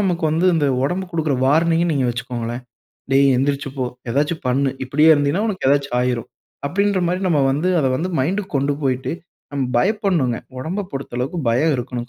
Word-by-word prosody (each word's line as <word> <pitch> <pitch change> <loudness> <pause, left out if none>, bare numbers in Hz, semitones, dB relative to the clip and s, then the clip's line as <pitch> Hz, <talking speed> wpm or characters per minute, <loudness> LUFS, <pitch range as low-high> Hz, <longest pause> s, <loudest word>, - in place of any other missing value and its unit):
நமக்கு 175 -4 0
வந்து 165 +4 +2
இந்த 155 -3 +2 0.2
ஒடம்பு 180 +8 -1
குடுக்கற 160 -4 0
வார்னிங்னு 165 +4 +3
நீங்க 140 -3 +1
வச்சுகோங்களேன். 120 0 -4 0.5
"டேய், 140 0 +5
எந்திரிச்சு 140 +1 0
போ, 130 - -1 0.3
ஏதாச்சும் 145 +6 0
பண்ணு, 135 +2 +2
இப்படியே 150 +5 +3
இருந்தீனா 145 +6 +1
உனக்கு 195 -9 -2
ஏதாச்சும் 140 -2 +1
ஆயிரும்," 125 -2 -1 0.4
அப்டீன்ற 195 +4 +1
மாதிரி 180 +2 -1
நம்ப 150 -4 +2
வந்து 150 +7 0
அத 135 - +1
வந்து 180 +5 -2
மைண்ட்க்கு 190 +7 -2
கொண்டு 140 +1 +1
போய்ட்டு 130 +1 -1 0.4
நம்ப 140 -2 -1
பயப்படணுங்க. 180 - +1 0.2
ஒடம்ப 185 +9 -3
பொறுத்தளவுக்கு 135 +3 -4
பயம் 145 +7 +2
இருக்கணும் 125 -1 -5
145 Hz, 165 wpm, -20 LUFS, 130-170 Hz, 0.5 s, டேய்